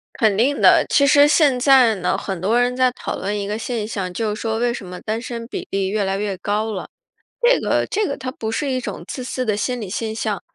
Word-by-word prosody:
肯 215 -3 +2
定 270 +6 +1
的。 - - +6
其 280 -1 +4
实 290 +1 +6
现 295 -4 +4
在 260 -4 +5
呢， 180 -1 0
很 190 -3 -5
多 225 +7 +2
人 245 +1 +1
在 255 0 +3
讨 - - -5
论 205 +1 -3
一 200 - -3
个 210 +2 -3
现 225 -2 -3
象， 190 -5 -4
就 210 +2 -2
说 220 0 -2
为 240 0 +1
什 215 - -7
么 180 0 -8
单 220 +1 -3
身 235 -1 -6
比 - - -6
例 195 -1 -1
越 210 +1 -1
来 195 0 -1
越 200 -2 -2
高 215 +3 -1
了。 190 - -5 0.5
这 - - +4
个 - - +1
这 420 +1 0
个 280 - -3
它 255 - -5
不 220 -5 -5
是 280 +5 -2
一 255 - 0
种 - - -6
自 255 - -5
私 255 0 -3
的 210 -3 0
心 245 +2 -2
理 200 - -6
现 220 +2 -3
象， 215 -3 -3
225 Hz, 275 characters per minute, -20 LUFS, 205-255 Hz, 0.5 s, 的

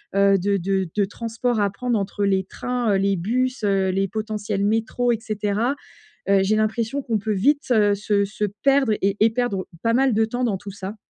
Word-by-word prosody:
heu, 200 0 +4
de 200 +2 +1
de 190 0 -1
de 205 -2 +2
transport 230 +3 -2
à 200 - +2
prendre 240 +3 -1
entre 200 +1 -3
les 190 -1 +1
trains, 245 +1 -2
heu, - - +3
les 195 0 +1
bus, 255 +7 -1
heu, 195 -2 +2
les 195 +1 0
potentiels 210 -1 -2
métros 225 +3 +1
et 225 - -3
cetera. 215 +3 -1 0.5
Heu, 195 -1 +4
j'ai 205 +3 +2
l'impression 225 +5 -1
qu'on 230 -3 0
peut 215 +1 -2
vite, 280 +7 +1
heu, 205 -3 +4
se 200 0 0
se 205 +1 -5 0.2
perdre 275 -4 +3
et 195 +1 +1
et 220 - +6
perdre 225 -5 -2 0.2
pas 230 - +2
mal 260 +1 +3
de 220 +1 +3
temps 245 +3 -3
dans 210 -5 0
tout 200 +2 -9
ça. 195 +1 -7
215 Hz, 210 wpm, -22 LUFS, 200-235 Hz, 0.5 s, et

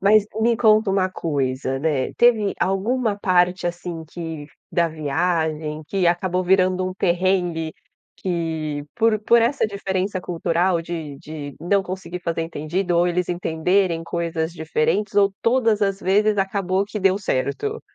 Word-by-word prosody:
Mas 205 +1 +5
me 230 +1 +3
conta 215 -2 +4
uma 190 -1 +1
coisa, 135 -6 -2
né. 145 -3 0
Teve 225 -4 +4
alguma 210 +4 0
parte 180 -2 +2
assim 175 -1 -5
que 160 -2 -7 0.2
da 170 -1 +2
viagem, 155 0 -1
que 190 0 0
acabou 180 +1 +1
virando 185 0 +2
um 185 - -3
perrengue, 175 -3 0 0.4
que 160 -5 -3
por 225 -1 +3
por 235 +2 +4
essa 235 +2 +2
diferença 195 -2 -2
cultural 175 0 0
de 160 -4 -6
de 145 -2 -8
não 195 +4 +2
conseguir 185 -1 -6
fazer 165 -1 -2
entendido 170 +3 -2
ou 175 +1 +4
eles 180 0 0
entenderem 175 +1 +1
coisas 170 -1 -2
diferentes 165 +6 -1
ou 200 -1 +4
todas 230 -3 +2
as 195 -1 0
vezes 210 +3 +2
acabou 195 0 0
que 210 +1 -5
deu 190 0 +3
certo? 205 - -2
180 Hz, 145 wpm, -22 LUFS, 165-195 Hz, 0.4 s, Mas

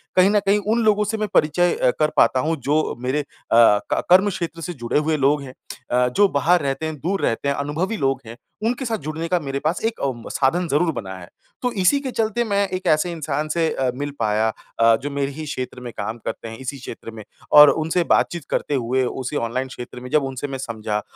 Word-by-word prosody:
कहीं 185 +1 +6
न 210 0 +3
कहीं 200 +1 +3
उन 235 0 +1
लोगों 210 -1 +3
से 215 +2 -2
मैं 215 0 -1
परिचय 170 +3 +3
अ, 125 - +2
कर 155 0 +3
पाता 130 - +4
हूँ 160 +5 0
जो 155 +1 +1
मेरे 130 +4 0
अ, - - -11 0.3
क 115 -3 +4
कर्मक्षेत्र 180 -3 +2
से 175 +3 -4
जुड़े 120 -1 -1
हुए 155 +1 0
लोग 145 +1 +2
हैं। 130 -2 -9 0.4
अ, 125 +1 +3
जो 205 - +5
बाहर 175 +2 +2
रहते 135 +2 -2
हैं, 155 0 -3
दूर 190 +7 -1
रहते 115 +5 -1
हैं, 140 - +1
अनुभवी 160 +10 -2
लोग 135 -3 0
हैं, 115 +1 -10 0.3
उनके 245 +3 -1
साथ 225 -2 -1
जुड़ने 160 -1 -5
का 180 +1 +1
मेरे 140 -3 -4
पास 155 +5 -1
एक 225 0 -1
अम, 120 -4 -3
साधन 170 +7 +1
ज़रूर 165 +3 +2
बना 95 -7 -6
है। 90 -1 -11 0.3
तो 250 - 0
इसी 235 +10 +4
के 270 -2 -5
चलते 225 0 0
मैं 200 -3 +1
एक 185 0 -4
ऐसे 155 +3 +2
इंसान 155 -2 -3
से 165 +1 +1
अ, 130 -1 0
मिल 145 +2 -4
पाया 110 +1 +1 0.3
अ, 115 0 +6
जो 145 - -3
मेरे 140 0 -2
ही 155 +3 -7
क्षेत्र 130 -4 -5
में 120 -1 -6
काम 110 +3 -4
करते - - -5
हैं 115 0 -8
इसी 130 +1 -5
क्षेत्र 120 -3 -9
में 110 -1 -10 0.3
और 150 0 +10
उनसे 160 +4 +1
बातचीत 170 -1 +1
करते - - -1
हुए 130 +1 0
उसी 130 +3 -4
ऑनलाइन 125 +3 -2
क्षेत्र 125 -1 -9
में 125 +1 -9
जब 150 +2 +2
उनसे 135 +1 -4
मैं 135 -1 -5
समझा 110 -4 -3
150 Hz, 235 wpm, -22 LUFS, 130-175 Hz, 0.4 s, और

